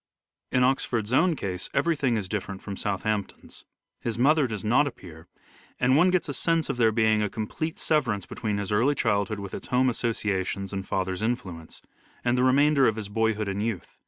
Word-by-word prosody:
In 125 Hz, -, +3 dB
Oxford's 125 Hz, -3 st, 0 dB
own 170 Hz, +5 st, +4 dB
case 95 Hz, -7 st, -4 dB
everything 140 Hz, -5 st, +1 dB
is 100 Hz, -3 st, -3 dB
different 95 Hz, -1 st, -4 dB
from 100 Hz, -, -7 dB
Oxford 100 Hz, -, -3 dB
at -, -, +2 dB
Southampton's. 100 Hz, +1 st, -4 dB, 0.3 s
His 115 Hz, -2 st, -3 dB
mother 145 Hz, +3 st, +4 dB
does 105 Hz, -4 st, -5 dB
not 125 Hz, +7 st, +3 dB
appear, 85 Hz, -, -10 dB, 0.5 s
and 125 Hz, +1 st, +3 dB
one 165 Hz, +5 st, +5 dB
Court 185 Hz, -, +2 dB
gets 180 Hz, -4 st, +1 dB
a -, -, -2 dB
sense 165 Hz, 0 st, +1 dB
of 130 Hz, -, -6 dB
there 115 Hz, -2 st, +4 dB
being 110 Hz, -1 st, +2 dB
a 105 Hz, -, 0 dB
complete 155 Hz, -, -4 dB
severance 120 Hz, -, 0 dB
between 105 Hz, -2 st, -3 dB
his 100 Hz, 0 st, -3 dB
early 120 Hz, +8 st, +3 dB
childhood 105 Hz, -4 st, 0 dB
with 100 Hz, -1 st, -7 dB
its -, -, -6 dB
home 125 Hz, +1 st, +2 dB
associations 100 Hz, -4 st, -2 dB
and 95 Hz, -1 st, -4 dB
father's 95 Hz, 0 st, -2 dB
influence, 95 Hz, -9 st, -4 dB, 0.4 s
and 120 Hz, 0 st, +3 dB
the 125 Hz, -, +2 dB
remainder 140 Hz, +1 st, +4 dB
of 110 Hz, -, +1 dB
his 105 Hz, -2 st, -6 dB
boyhood 110 Hz, 0 st, 0 dB
and 100 Hz, +1 st, -2 dB
youth. 110 Hz, -5 st, -4 dB
110 Hz, 200 wpm, -26 LUFS, 100-130 Hz, 0.5 s, one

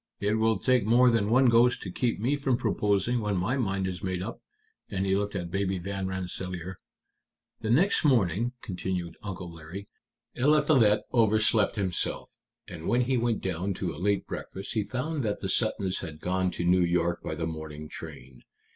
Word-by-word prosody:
"It 105 Hz, +2 st, +1 dB
will 110 Hz, -1 st, +3 dB
take 125 Hz, 0 st, +2 dB
more 125 Hz, +2 st, +6 dB
than 110 Hz, -3 st, +1 dB
one 130 Hz, +3 st, +5 dB
ghost 120 Hz, +1 st, +4 dB
to 95 Hz, -, -6 dB
keep 120 Hz, +4 st, -1 dB
me 125 Hz, +7 st, +1 dB
from 135 Hz, -4 st, 0 dB
proposing 105 Hz, +2 st, +1 dB
when 105 Hz, -3 st, -1 dB
my 95 Hz, +9 st, 0 dB
mind 95 Hz, -7 st, -1 dB
is 95 Hz, -1 st, -4 dB
made 95 Hz, -2 st, -2 dB
up." 115 Hz, +4 st, -7 dB, 0.5 s
And 95 Hz, -1 st, -2 dB
he 95 Hz, 0 st, +2 dB
looked 100 Hz, +1 st, -2 dB
at 85 Hz, -2 st, -4 dB
Baby 95 Hz, 0 st, 0 dB
Van 95 Hz, +1 st, -4 dB
Rensselaer. 90 Hz, -1 st, -5 dB, 0.8 s
"The 110 Hz, -, -4 dB
next 170 Hz, -, +3 dB
morning," 120 Hz, -, +2 dB
continued 90 Hz, -2 st, -4 dB
Uncle 90 Hz, -4 st, -6 dB
Larry, 85 Hz, +5 st, -9 dB, 0.5 s
"Eliphalet 135 Hz, -5 st, +4 dB
overslept 110 Hz, -2 st, +3 dB
himself, 95 Hz, -4 st, -1 dB, 0.4 s
and 85 Hz, -2 st, -7 dB
when 120 Hz, +1 st, +3 dB
he 130 Hz, +1 st, +1 dB
went 120 Hz, -2 st, 0 dB
down 95 Hz, +1 st, -2 dB
to 85 Hz, -3 st, -3 dB
a 75 Hz, -, -9 dB
late 100 Hz, +1 st, +1 dB
breakfast 95 Hz, -, -6 dB
he 110 Hz, -, +1 dB
found 130 Hz, +8 st, -3 dB
that 105 Hz, -4 st, -1 dB
the 95 Hz, -, -3 dB
Suttons 100 Hz, -2 st, +1 dB
had 80 Hz, -4 st, -7 dB
gone 95 Hz, +2 st, 0 dB
to 85 Hz, -, -4 dB
New 90 Hz, +1 st, +4 dB
York 85 Hz, 0 st, +1 dB
by 80 Hz, -, -4 dB
the 80 Hz, +1 st, -3 dB
morning 80 Hz, -1 st, -6 dB
train. 65 Hz, -3 st, -10 dB
100 Hz, 180 wpm, -28 LUFS, 90-115 Hz, 0.8 s, more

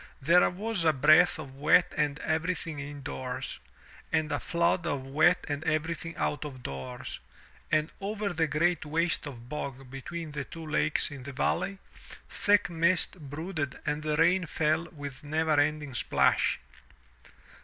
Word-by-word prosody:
There 170 Hz, +6 st, +5 dB
was 200 Hz, 0 st, -2 dB
a 160 Hz, -1 st, +4 dB
breath 155 Hz, +6 st, +6 dB
of 140 Hz, -4 st, -8 dB
wet 150 Hz, +5 st, +4 dB
on 145 Hz, -1 st, +1 dB
everything 160 Hz, -1 st, -1 dB
in 140 Hz, 0 st, -7 dB
doors, 130 Hz, -2 st, -5 dB, 0.5 s
and 155 Hz, -1 st, +1 dB
a -, -, 0 dB
flood 170 Hz, 0 st, +1 dB
of 145 Hz, -4 st, -1 dB
wet 155 Hz, +6 st, +3 dB
on 145 Hz, 0 st, -2 dB
everything 160 Hz, +1 st, -2 dB
out 150 Hz, -, -1 dB
of 130 Hz, -4 st, -8 dB
doors, 65 Hz, -2 st, -6 dB, 0.5 s
and 155 Hz, +1 st, +2 dB
over 205 Hz, +1 st, -2 dB
the 160 Hz, -1 st, +1 dB
great 160 Hz, +3 st, +1 dB
waste 160 Hz, +1 st, 0 dB
of 120 Hz, -4 st, -9 dB
bog 135 Hz, -2 st, -6 dB
between 155 Hz, +4 st, -6 dB
the 145 Hz, -1 st, -3 dB
two 165 Hz, -1 st, -9 dB
lakes 155 Hz, 0 st, +1 dB
in 140 Hz, -2 st, -8 dB
the 140 Hz, +2 st, -7 dB
valley, 195 Hz, +7 st, 0 dB, 0.5 s
thick 205 Hz, 0 st, +3 dB
mist 170 Hz, +2 st, +2 dB
brooded 145 Hz, 0 st, -4 dB
and 150 Hz, +1 st, -1 dB
the 155 Hz, 0 st, -1 dB
rain 175 Hz, +2 st, +3 dB
fell 155 Hz, +2 st, +1 dB
with 145 Hz, -6 st, -8 dB
never 155 Hz, 0 st, +1 dB
ending 145 Hz, -1 st, 0 dB
splash. 120 Hz, -, +2 dB
155 Hz, 155 wpm, -29 LUFS, 145-170 Hz, 0.5 s, breath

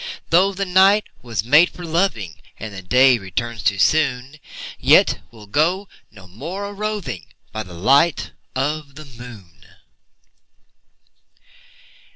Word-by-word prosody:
Though 185 Hz, +4 st, +4 dB
the 195 Hz, 0 st, -3 dB
night 190 Hz, +3 st, +4 dB, 0.2 s
was 115 Hz, -5 st, -3 dB
made 150 Hz, +9 st, +5 dB
for 175 Hz, -, -10 dB
loving, 160 Hz, -, -1 dB, 0.2 s
And 110 Hz, -1 st, -8 dB
the 95 Hz, -, -8 dB
day 125 Hz, +6 st, +4 dB
returns 115 Hz, +4 st, -4 dB
too 100 Hz, -, +1 dB
soon, 135 Hz, +2 st, +1 dB, 0.4 s
Yet -, -, +4 dB
we'll 110 Hz, -3 st, -15 dB
go 170 Hz, -, 0 dB, 0.2 s
no 100 Hz, -3 st, -16 dB
more 175 Hz, -, -6 dB
a 200 Hz, -, -7 dB
roving 210 Hz, -, -4 dB, 0.2 s
By 110 Hz, -, -4 dB
the 90 Hz, -4 st, -10 dB
light 140 Hz, -, +2 dB, 0.2 s
of 145 Hz, +1 st, -3 dB
the 155 Hz, +1 st, -10 dB
moon. 120 Hz, -9 st, -13 dB
135 Hz, 130 wpm, -20 LUFS, 110-175 Hz, 0.4 s, made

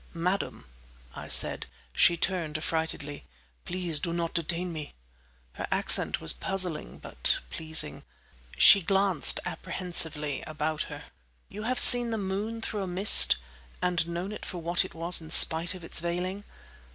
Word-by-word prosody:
"Madam," 180 Hz, -, -5 dB, 0.5 s
I -, -, -11 dB
said. -, -, -1 dB, 0.3 s
She 170 Hz, -, +2 dB
turned 170 Hz, -4 st, -4 dB
affrightedly. 155 Hz, -2 st, -6 dB, 0.4 s
"Please 175 Hz, -4 st, -3 dB
do 170 Hz, +1 st, -6 dB
not 170 Hz, -1 st, -5 dB
detain 170 Hz, +1 st, -5 dB
me!" 155 Hz, -2 st, -10 dB, 0.6 s
Her -, -, -8 dB
accent -, -, -1 dB
was 80 Hz, -, +2 dB
puzzling, 185 Hz, -5 st, -2 dB
but -, -, +2 dB
pleasing. 160 Hz, -, -4 dB, 0.6 s
She 200 Hz, -, +6 dB
glanced 195 Hz, -3 st, 0 dB
apprehensively 155 Hz, -5 st, -4 dB
about 155 Hz, 0 st, -5 dB
her. 145 Hz, 0 st, -11 dB, 0.5 s
You 210 Hz, -, -11 dB
have 255 Hz, -, -3 dB
seen 245 Hz, -1 st, +9 dB
the 225 Hz, -, -5 dB
moon 205 Hz, +3 st, -6 dB
through 210 Hz, -2 st, -6 dB
a 190 Hz, -, -6 dB
mist?—and 165 Hz, -, +4 dB
known 175 Hz, +4 st, -7 dB
it 210 Hz, -, -11 dB
for 180 Hz, -, -9 dB
what 170 Hz, +1 st, -2 dB
it 185 Hz, -, -13 dB
was 170 Hz, +1 st, -2 dB
in 160 Hz, -, -14 dB
spite 165 Hz, +2 st, +5 dB
of 180 Hz, -, -14 dB
its 165 Hz, -, -3 dB
veiling? 180 Hz, +4 st, -6 dB
170 Hz, 145 wpm, -25 LUFS, 160-190 Hz, 0.6 s, seen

